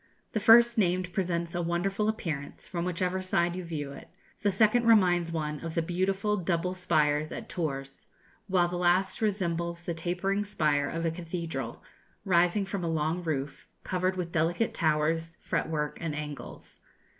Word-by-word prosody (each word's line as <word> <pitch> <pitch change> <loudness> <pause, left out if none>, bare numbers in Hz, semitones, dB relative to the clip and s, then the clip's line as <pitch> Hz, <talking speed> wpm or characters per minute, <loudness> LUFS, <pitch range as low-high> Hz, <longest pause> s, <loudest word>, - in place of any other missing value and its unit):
The 215 - 0
first 235 +2 +7
named 180 -1 +1
presents 170 -3 -1
a 175 - -1
wonderful 195 +5 0
appearance, 155 -9 -4
from 170 -2 -3
whichever 180 +1 -1
side 175 -2 +1
you 185 - -4
view 150 -4 -4
it; 140 - -10 0.3
the 205 - +2
second 220 +4 +3
reminds 175 -6 +4
one 150 -2 -2
of 165 +1 -6
the 165 - +1
beautiful 190 +4 0
double 180 0 0
spires 155 -4 +1
at - - -6
Tours; 135 -5 -4 0.4
while 180 -3 +3
the 175 0 -3
last 180 +3 +2
resembles 170 -5 -1
the 170 - -2
tapering 180 +5 -1
spire 150 -8 +1
of 165 0 -3
a 165 - +1
cathedral, 170 0 -5 0.4
rising 180 +2 +3
from 195 -1 -4
a - - -1
long 160 +2 0
roof, 145 -4 -3 0.2
covered 185 0 0
with 175 -2 -3
delicate 170 +7 +1
towers, 160 0 0
fret - - -2
work, 150 -2 -2
and 160 -3 -2
angles. 150 -1 -7
175 Hz, 165 wpm, -29 LUFS, 160-185 Hz, 0.4 s, first